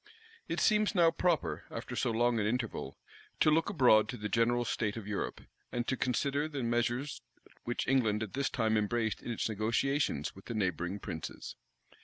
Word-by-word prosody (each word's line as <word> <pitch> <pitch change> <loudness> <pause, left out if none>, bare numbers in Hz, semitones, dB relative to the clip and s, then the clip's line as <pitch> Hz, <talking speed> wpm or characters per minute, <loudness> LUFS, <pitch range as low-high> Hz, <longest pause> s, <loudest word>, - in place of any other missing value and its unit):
It - - -2
seems 215 -2 +3
now 170 -2 +5
proper, 170 -1 0
after - - -6
so - - +1
long 120 +1 +2
an 105 - +1
interval, 120 0 -3 0.4
to 155 - +5
look 165 +4 +2
abroad 120 - +5
to 125 - -4
the 105 -1 -4
general 120 +2 +2
state 110 -1 -1
of 110 - -6
Europe, 105 -1 -3 0.3
and 120 -1 -2
to 130 - +1
consider 140 +4 0
the 145 -4 -4
measures 120 +4 -1 0.4
which 120 - -2
England 110 -5 +2
at 105 - -7
this 140 0 0
time 110 -3 +1
embraced 110 0 0
in - - -7
its 115 - -1
negotiations 110 - 0
with 95 - -14
the 115 - -5
neighboring 90 -2 -1
princes. 85 -6 -6
120 Hz, 180 wpm, -32 LUFS, 110-135 Hz, 0.4 s, now